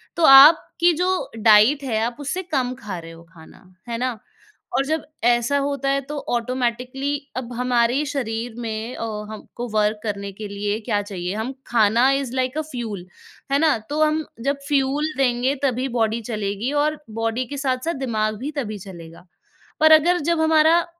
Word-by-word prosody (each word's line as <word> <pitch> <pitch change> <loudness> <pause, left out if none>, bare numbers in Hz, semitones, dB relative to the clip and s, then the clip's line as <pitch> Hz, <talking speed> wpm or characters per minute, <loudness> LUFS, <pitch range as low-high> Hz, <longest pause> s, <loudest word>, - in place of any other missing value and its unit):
तो, 340 - -1
आपकी 315 +5 +7
जो 365 +3 -1
डाइट 220 +6 +5
है, 225 -5 -1
आप 235 +2 -3
उससे 290 +6 -3
कम 255 -4 0
खा 205 -7 -6
रहे 165 0 -10
हो 165 0 -14
खाना, 160 -2 -16 0.3
है 230 - -2
ना? 250 -2 -2 0.6
और 275 - +1
जब 315 +2 -2 0.2
ऐसा 240 +3 +2
होता 280 -1 -2
है, 275 0 +1
तो 290 +2 -7
ऑटोमैटिकली 250 +3 -2 0.3
अब 245 -1 -5
हमारे 245 +2 +1
शरीर 240 -4 -4
में 225 +2 -4
अ, - - -5 0.3
हमको 235 +3 -8
वर्क 210 0 +1
करने 200 -2 -4
के 210 +2 -8
लिए 205 +1 -3
क्या 205 - +1
चाहिए? 190 -3 -5
हम 225 +5 -3
खाना 230 +2 +3
इज़ 275 -3 -1
लाइक 260 +2 -1
अ 310 - +1
फ्यूल, 215 -7 -5 0.5
है 280 - +3
ना? 310 -4 +3
तो 300 +2 -1
हम 310 0 +1 0.2
जब 280 - -1
फ्यूल 290 +2 0
देंगे 255 +1 +1
तभी 260 -1 0
बॉडी 225 +1 0
चलेगी 210 +3 -2
और 305 0 -2 0.2
बॉडी 225 +3 -1
के 285 +3 -7
साथ-साथ 270 +4 -1
दिमाग 215 -2 -1
भी 280 +5 -4
तभी 215 -3 -5
चलेगा। 170 -1 -12 0.5
पर 315 0 +6
अगर 350 +3 +1
जब 330 - +1
हमारा 320 +1 +4
250 Hz, 175 wpm, -22 LUFS, 220-285 Hz, 0.6 s, आपकी